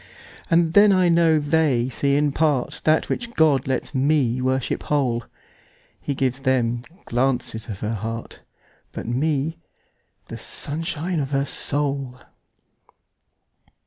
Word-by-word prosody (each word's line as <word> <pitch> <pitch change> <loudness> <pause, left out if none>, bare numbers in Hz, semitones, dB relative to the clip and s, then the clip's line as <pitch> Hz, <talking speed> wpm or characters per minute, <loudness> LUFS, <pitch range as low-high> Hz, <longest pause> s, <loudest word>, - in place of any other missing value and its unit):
And 165 -1 +3
then 205 +1 +7
I 185 -2 +4
know 165 -1 +4
they 145 -5 +2
see 140 +2 0
in 145 0 +2
partThat 150 +1 +1
which 240 -1 -4
God 145 -5 +3
lets 130 +2 -2
me 130 -3 +1
worship 130 0 -1
whole:He 135 +1 -4
gives 130 -1 -1
them 120 -3 +1 0.2
glances 125 -2 -1
of 100 -3 -6
her 110 +1 -2
heart, 115 +2 -5 0.5
But - - -6
me, 150 +5 -1 0.7
the - - -8
sunshine 165 +3 -4
of 135 -2 -2
her 140 0 0
soul. 140 -3 -2
140 Hz, 115 wpm, -23 LUFS, 125-155 Hz, 0.7 s, then